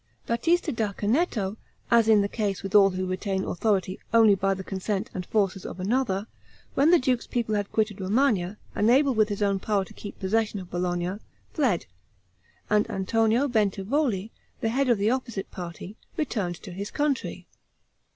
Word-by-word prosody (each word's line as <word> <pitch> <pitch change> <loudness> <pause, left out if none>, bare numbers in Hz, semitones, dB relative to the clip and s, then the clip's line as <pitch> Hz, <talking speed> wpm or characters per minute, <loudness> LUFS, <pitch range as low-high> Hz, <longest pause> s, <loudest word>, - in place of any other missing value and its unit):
Batista 330 +8 +1
da 220 -5 -1
Canneto, 215 - 0 0.3
as 230 -1 +5
in 215 -2 +6
the - - 0
case 200 -3 -2
with 195 +1 -5
all 200 -2 +7
who 185 0 -3
retain 190 +1 -2
authority 190 0 0
only 225 -2 +6
by 195 0 +1
the 190 - -6
consent 195 +2 -3
and 180 -1 -5
forces 195 -3 0
of - - -7
another, 205 -1 0 0.5
when 285 +4 +4
the 350 - +7
duke's 255 -4 0
people 235 -3 -1
had 205 -1 -1
quitted 215 -2 0
Romagna, 205 -2 +1 0.2
unable 260 +6 +4
with 215 -2 +3
his 205 0 -1
own 200 -1 +1
power 200 -1 0
to - - -14
keep 205 - -9
possession 210 +1 0
of 180 -2 -10
Bologna, 175 +1 -1 0.4
fled, 250 - +1 0.8
and 210 0 +2
Antonio 225 +6 +1
Bentivogli, 215 0 0 0.3
the 225 - 0
head 265 +3 +1
of 235 - +4
the 205 +3 +2
opposite 240 -6 -3
party, 180 +3 -8 0.2
returned 210 - -1
to 190 - -8
his 200 +3 -5
country. 290 -2 -2
210 Hz, 170 wpm, -26 LUFS, 190-235 Hz, 0.8 s, all